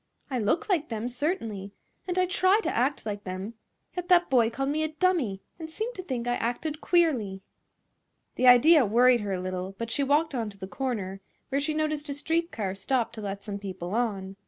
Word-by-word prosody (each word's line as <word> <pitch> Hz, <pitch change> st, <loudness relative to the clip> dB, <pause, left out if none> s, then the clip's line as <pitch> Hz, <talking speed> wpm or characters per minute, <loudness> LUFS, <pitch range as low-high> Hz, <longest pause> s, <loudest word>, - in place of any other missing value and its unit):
I 255 Hz, -, 0 dB
look 220 Hz, -, +1 dB
like 340 Hz, -6 st, +1 dB
them, 225 Hz, +1 st, -3 dB
certainly; 230 Hz, -, -3 dB, 0.3 s
and 360 Hz, 0 st, -2 dB
I 370 Hz, -, +4 dB
try 375 Hz, +2 st, +3 dB
to -, -, -2 dB
act 260 Hz, +3 st, 0 dB
like 205 Hz, -1 st, -4 dB
them; 185 Hz, +4 st, -5 dB, 0.4 s
yet 360 Hz, -1 st, -4 dB
that 355 Hz, -4 st, +4 dB
boy 235 Hz, -4 st, +5 dB
called 270 Hz, +4 st, -2 dB
me 305 Hz, +2 st, 0 dB
a 315 Hz, -, +1 dB
dummy 310 Hz, -, 0 dB, 0.2 s
and 320 Hz, -1 st, -6 dB
seemed 440 Hz, +9 st, -4 dB
to 370 Hz, -, -6 dB
think 250 Hz, -8 st, -4 dB
I 245 Hz, -, +1 dB
acted 290 Hz, +7 st, -3 dB
queerly." 245 Hz, -, +1 dB, 0.9 s
This 255 Hz, -, +2 dB
idea 285 Hz, +5 st, +8 dB
worried 240 Hz, +2 st, +4 dB
her 200 Hz, -2 st, -2 dB
a 185 Hz, -, -2 dB
little, 185 Hz, +1 st, -4 dB
but 230 Hz, +1 st, -4 dB
she 285 Hz, -, +1 dB
walked 295 Hz, +3 st, +2 dB
on 230 Hz, -4 st, -2 dB
to 200 Hz, -, -13 dB
the 190 Hz, -, -6 dB
corner, 195 Hz, -4 st, -3 dB, 0.3 s
where 275 Hz, +1 st, 0 dB
she 305 Hz, +1 st, -1 dB
noticed 305 Hz, -1 st, -1 dB
a 280 Hz, -, -2 dB
street 330 Hz, +4 st, -1 dB
car 195 Hz, -4 st, -3 dB
stop 235 Hz, +5 st, -1 dB
to 220 Hz, -, -7 dB
let 200 Hz, -1 st, -5 dB
some 200 Hz, -2 st, -5 dB
people 190 Hz, -2 st, -6 dB
on. 200 Hz, -5 st, -2 dB
245 Hz, 210 wpm, -27 LUFS, 205-310 Hz, 0.9 s, idea